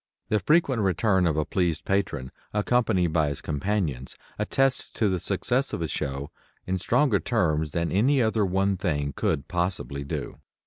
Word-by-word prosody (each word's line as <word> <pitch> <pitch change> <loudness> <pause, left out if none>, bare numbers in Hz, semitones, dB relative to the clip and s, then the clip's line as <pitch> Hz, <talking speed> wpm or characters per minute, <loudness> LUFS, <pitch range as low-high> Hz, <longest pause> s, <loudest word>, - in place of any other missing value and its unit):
The 105 - +2
frequent 140 - +2
return 95 -1 +2
of 80 -2 0
a 75 - +1
pleased 85 -4 -1
patron 75 -10 -1 0.2
accompanied 105 -6 +2
by 80 -2 +3
his 70 - -4
companions 75 -5 -2 0.2
attests 135 -1 +1
the 95 -5 +2
success 130 +9 -1
of - - -2
a - - -1
show 70 0 -4 0.3
in 95 0 -1
stronger 115 - +2
terms 80 -1 0
than 85 0 -1
any 130 +9 +3
other 110 -2 +2
one 95 +1 +1
thing 75 -7 -1
could 70 - -1
possibly 85 -5 -2
do. 70 - -5
95 Hz, 155 wpm, -26 LUFS, 75-105 Hz, 0.3 s, by